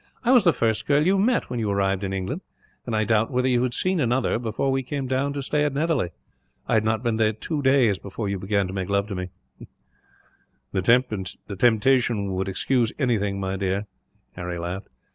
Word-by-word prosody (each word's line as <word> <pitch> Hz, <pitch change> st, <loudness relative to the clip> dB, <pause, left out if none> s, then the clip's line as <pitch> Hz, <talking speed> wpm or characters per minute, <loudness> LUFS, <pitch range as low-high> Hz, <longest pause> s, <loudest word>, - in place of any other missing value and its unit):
I 245 Hz, -, +3 dB
was 250 Hz, -5 st, +6 dB
the 175 Hz, -, +5 dB
first 110 Hz, -7 st, 0 dB
girl 145 Hz, +1 st, +3 dB
you 190 Hz, +2 st, +3 dB
met, 235 Hz, +5 st, +1 dB
when 125 Hz, -, -2 dB
you 110 Hz, -2 st, -1 dB
arrived 100 Hz, -1 st, 0 dB
in 95 Hz, -, -2 dB
England; 95 Hz, -, -3 dB, 0.5 s
and 115 Hz, -, -1 dB
I 110 Hz, -, +2 dB
doubt 110 Hz, +1 st, +2 dB
whether 125 Hz, 0 st, +1 dB
you 125 Hz, -2 st, +2 dB
had 125 Hz, -1 st, -1 dB
seen 185 Hz, -1 st, +1 dB
another, 125 Hz, -3 st, +1 dB
before 120 Hz, +3 st, -1 dB
we 135 Hz, 0 st, +1 dB
came 135 Hz, +1 st, -4 dB
down 135 Hz, +2 st, 0 dB
to 140 Hz, -1 st, -4 dB
stay 150 Hz, +2 st, +1 dB
at 145 Hz, -2 st, -1 dB
Netherly. 150 Hz, -, +1 dB, 0.6 s
I -, -, 0 dB
had 110 Hz, -1 st, +3 dB
not 110 Hz, +1 st, 0 dB
been 115 Hz, -2 st, 0 dB
there 110 Hz, -1 st, +2 dB
two 145 Hz, +8 st, -3 dB
days 130 Hz, -7 st, +3 dB
before 100 Hz, +2 st, -5 dB
you 100 Hz, -1 st, -2 dB
began 100 Hz, +1 st, 0 dB
to 95 Hz, -, -6 dB
make 95 Hz, -1 st, -3 dB
love 100 Hz, 0 st, +1 dB
to 100 Hz, -, -3 dB
me." 90 Hz, 0 st, -4 dB, 1.4 s
"The 100 Hz, -2 st, 0 dB
temptation 115 Hz, -3 st, +2 dB
would 95 Hz, +1 st, -2 dB
excuse 115 Hz, +4 st, +1 dB
anything, 105 Hz, -7 st, 0 dB
my 95 Hz, 0 st, -2 dB
dear," 100 Hz, +1 st, -1 dB, 0.5 s
Harry 90 Hz, -1 st, -5 dB
laughed. 90 Hz, +4 st, -5 dB
110 Hz, 205 wpm, -24 LUFS, 100-135 Hz, 1.4 s, was